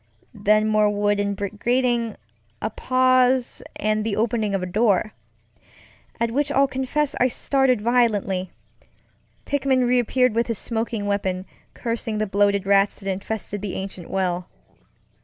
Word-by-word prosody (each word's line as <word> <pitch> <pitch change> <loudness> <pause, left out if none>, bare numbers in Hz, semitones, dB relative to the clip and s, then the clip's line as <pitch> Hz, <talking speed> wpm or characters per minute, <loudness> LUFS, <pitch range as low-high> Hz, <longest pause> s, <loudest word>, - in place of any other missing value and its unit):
Then 215 +1 +2
more 215 -1 +3
wood 205 0 +1
and 200 0 -1
brick 200 +1 -5
grating, 240 -2 +1 0.4
a 215 - -3
pause, 255 +1 +2
and 215 0 0
the 215 -2 -1
opening 220 -2 0
of 195 - -1
the - - -2
doorŌĆöat 215 +3 -3
which 285 +3 0
I'll 275 -1 +3
confess 265 +3 -1
I 250 - +4
started 260 -2 +1
violently. 210 -6 +1 1.0
Pickman 270 -3 +1
reappeared 250 0 +2
with 235 +1 0
his 230 -3 -2
smoking 225 -1 -3
weapon, 190 -2 -1 0.3
cursing 230 -2 -3
the 215 - 0
bloated 200 0 +1
rats 200 0 +3
that 195 -1 -3
infested 205 +1 -5
the 205 -2 -4
ancient 190 -3 -6
well. 180 -2 -1
215 Hz, 140 wpm, -23 LUFS, 200-245 Hz, 1.0 s, I